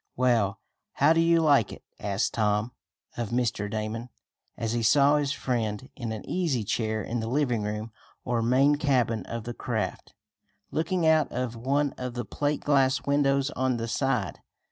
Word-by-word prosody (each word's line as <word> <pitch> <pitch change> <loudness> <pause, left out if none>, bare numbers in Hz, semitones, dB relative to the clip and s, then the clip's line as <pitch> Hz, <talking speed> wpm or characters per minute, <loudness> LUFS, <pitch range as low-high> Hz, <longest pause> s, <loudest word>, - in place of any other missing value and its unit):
"Well, 120 -6 +2 0.4
how 145 +4 +4
do 165 - +2
you 165 0 +4
like 140 -9 +4
it?" - - -11 0.2
asked 100 +1 -1
Tom 105 +1 +1 0.5
of 120 -3 -2
Mr. 120 -4 -1
Damon, 110 +3 -4 0.5
as 115 0 -2
he 120 - 0
saw 140 +5 +5
his 145 -2 0
friend 120 -3 -2
in 115 -3 -4
an 110 - -6
easy 160 -11 0
chair 110 0 -1
in 120 +4 -3
the 110 - -3
living 125 -3 +1
room 105 +2 -4 0.3
or 120 -1 0
main 135 +5 +4
cabin 125 -8 +1
of 115 -1 -5
the 120 +1 -5
craft, 110 -7 -4 0.6
looking 165 +2 0
out 160 -1 +4
of 125 -1 -3
one 140 +4 0
of 125 -1 -4
the 120 -1 -3
plate 145 +7 -1
glass 135 -2 +2
windows 140 0 +2
on 130 -3 0
the 115 0 -3
side. 125 -5 -1
125 Hz, 170 wpm, -27 LUFS, 110-140 Hz, 0.6 s, saw